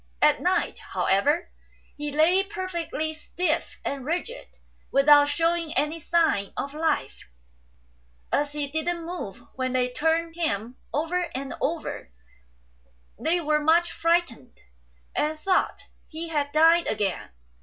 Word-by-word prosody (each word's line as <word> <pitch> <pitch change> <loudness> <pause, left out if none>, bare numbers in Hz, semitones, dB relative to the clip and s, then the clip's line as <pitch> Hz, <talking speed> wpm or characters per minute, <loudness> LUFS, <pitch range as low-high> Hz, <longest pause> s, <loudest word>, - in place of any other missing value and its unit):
At - - +4
night, - - 0
how - - -3
ever, 290 - +2 0.4
he 295 0 -4
lay 320 +6 +4
perfectly 370 -5 -3
stiff 315 +1 -2
and 275 -2 -3
rigid, 355 - -4 0.3
without 290 +1 +6
shewing 330 +2 0
any 300 +3 +1
signs 320 - +1
of 280 - -3
life; 310 - -2 1.0
and, - - +3
as 290 0 -5
he 295 -1 -1
didn't 325 +4 -2
move 240 - -6
when 255 -1 -2
they 250 -1 +1
turned 325 +4 0
him 245 - -2 0.2
over 340 +3 -1
and 270 +1 -4
over, 315 - -3 1.1
they 325 +8 +1
were 305 -1 +2
much 330 +3 +3
frightened, 330 - 0 0.6
and 310 +1 0
thought 370 +4 0 0.2
he 330 +1 -6
had 290 -3 -1
died 330 +3 +5
again. 205 -3 -1
315 Hz, 130 wpm, -26 LUFS, 285-335 Hz, 1.1 s, without